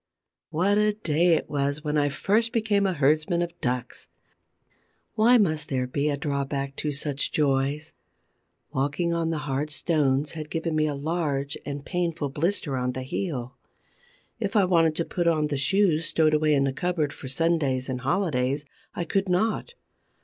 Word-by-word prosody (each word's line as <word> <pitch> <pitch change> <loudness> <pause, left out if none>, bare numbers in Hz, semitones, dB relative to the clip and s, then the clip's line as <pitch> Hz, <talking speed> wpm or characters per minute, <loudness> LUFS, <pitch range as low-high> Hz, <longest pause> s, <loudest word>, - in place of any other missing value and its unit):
What 195 +6 +2
a 210 0 +3
day 170 -4 +2
it - - -2
was 145 +1 -1
when 150 -1 -1
I 145 -1 +2
first 220 +10 +1
became 210 -3 +2
a 190 - 0
herdsman 155 +3 +2
of 170 0 -5
ducks! 125 0 -3 1.1
Why 235 +3 +5
must 155 -8 +1
there 130 -2 0
be 140 +4 -1
a 145 - -1
drawback 140 -1 -2
to 150 - -1
such 140 0 -1
joys? 145 +1 0 0.8
Walking 145 +6 0
on 165 -1 0
the 165 - -1
hard 140 +2 -1
stones 145 -2 +1
had 155 -2 -7
given 165 0 -2
me 155 0 +2
a 145 - -2
large 145 -2 -2
and 145 0 -5
painful 170 -5 -1
blister 150 0 -1
on 125 0 -1
the 130 - -4
heel. 130 -3 -4 0.8
If 200 - -2
I 210 - +6
had 185 -1 0
wanted 165 -2 +4
to 165 - -1
put 175 -1 -1
on 155 -3 +2
the 145 - -1
shoes 165 +3 +2
stowed 155 -1 +2
away 155 0 +3
in 135 - +3
the 135 -1 0
cupboard 165 -2 -1
for 130 - -9
Sundays 140 -3 0
and 130 -2 -3
holidays, 140 -3 0 0.3
I - - -1
could 195 +3 -1
not. 220 - 0
150 Hz, 175 wpm, -26 LUFS, 140-175 Hz, 1.1 s, I